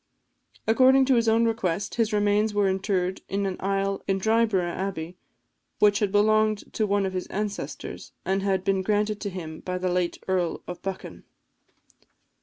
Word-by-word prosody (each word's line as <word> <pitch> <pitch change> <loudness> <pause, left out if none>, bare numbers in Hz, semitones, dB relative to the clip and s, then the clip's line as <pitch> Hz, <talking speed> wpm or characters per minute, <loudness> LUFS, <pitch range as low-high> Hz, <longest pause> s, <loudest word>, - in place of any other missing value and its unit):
According 260 +4 +5
to 265 - +3
his 230 -1 +3
own 225 +1 +3
request, 200 -4 -1
his 230 -1 +1
remains 210 0 +2
were 205 -1 +3
interred 190 -1 -1
in 200 +1 -1
an 190 -1 -2
aisle 195 0 -1
in 195 0 +1
Dryburgh 215 -4 +1
Abbey, 180 -3 -4 0.6
which 205 -1 +4
had 205 -3 0
belonged 215 0 +2
to 215 - 0
one 200 0 +1
of 190 - -3
his 185 -1 -3
ancestors, 205 0 -5
and 195 +1 0
had 190 -2 0
been 195 -1 +1
granted 210 +1 0
to 205 - -2
him 160 -4 -7
by 180 0 -4
the 180 0 -1
late 180 -1 0
Earl 180 -3 -1
of 180 - -7
Buchan. 195 -1 -6
195 Hz, 170 wpm, -26 LUFS, 185-215 Hz, 0.6 s, According